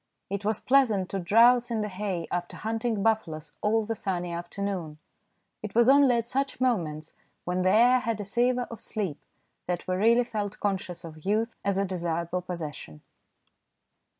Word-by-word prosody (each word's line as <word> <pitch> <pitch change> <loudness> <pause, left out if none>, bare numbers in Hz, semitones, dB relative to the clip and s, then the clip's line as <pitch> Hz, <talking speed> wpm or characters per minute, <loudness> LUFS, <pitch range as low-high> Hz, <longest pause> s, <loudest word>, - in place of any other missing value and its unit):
It 200 0 -3
was 215 +1 0
pleasant 230 -9 +3
to 195 - -2
drowse 235 +7 +5
in 225 -2 -1
the 210 - -1
hay 185 -3 -3
after 175 0 -3
hunting 225 -1 -2
buffaloes 165 -9 0
all 220 +1 +2
the 225 - -2
sunny 180 -5 -3
afternoon. 175 -2 -4 0.6
It 210 -1 -7
was 235 0 +5
only 275 -2 +6
at 230 -1 0
such 270 +2 -2
moments, 165 -12 -1 0.3
when 180 +1 -1
the 185 - +3
air 240 +5 +5
had 230 -4 -2
a 205 - -4
savour 245 +4 +1
of 230 - -8
sleep, 195 -9 -4 0.5
that 175 0 -3
we 185 - 0
really 230 +6 +4
felt 210 -4 -4
conscious 190 -3 -2
of 155 -2 -10
youth 220 +4 0
as 200 -1 0
a 200 - +1
desirable 175 -1 -2
possession. 155 - -7
200 Hz, 170 wpm, -27 LUFS, 180-230 Hz, 0.6 s, only